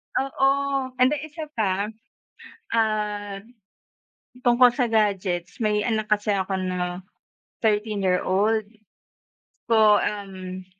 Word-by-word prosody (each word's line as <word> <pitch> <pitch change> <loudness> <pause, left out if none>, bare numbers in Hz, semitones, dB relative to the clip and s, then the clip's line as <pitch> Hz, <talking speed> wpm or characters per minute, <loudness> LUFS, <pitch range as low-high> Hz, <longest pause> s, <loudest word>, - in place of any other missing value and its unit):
Oo, 270 0 +1 0.5
and 255 +2 +4
di 300 - -1
isa 315 +1 -7 0.2
pa, 200 +1 0 0.8
ah, 210 -2 -1 1.0
tungkol 245 0 +6
sa 240 -3 0
gadgets, 195 -2 0
may 210 -1 +2
anak 215 -1 -1
kasi 205 -1 +2
ako 190 0 -1
na 180 -1 -3 0.6
13 210 -1 0
year 185 -1 +1
old. 210 +4 +1 1.1
Po 215 -2 +5
um, 185 -2 -5
210 Hz, 105 wpm, -24 LUFS, 190-220 Hz, 1.1 s, tungkol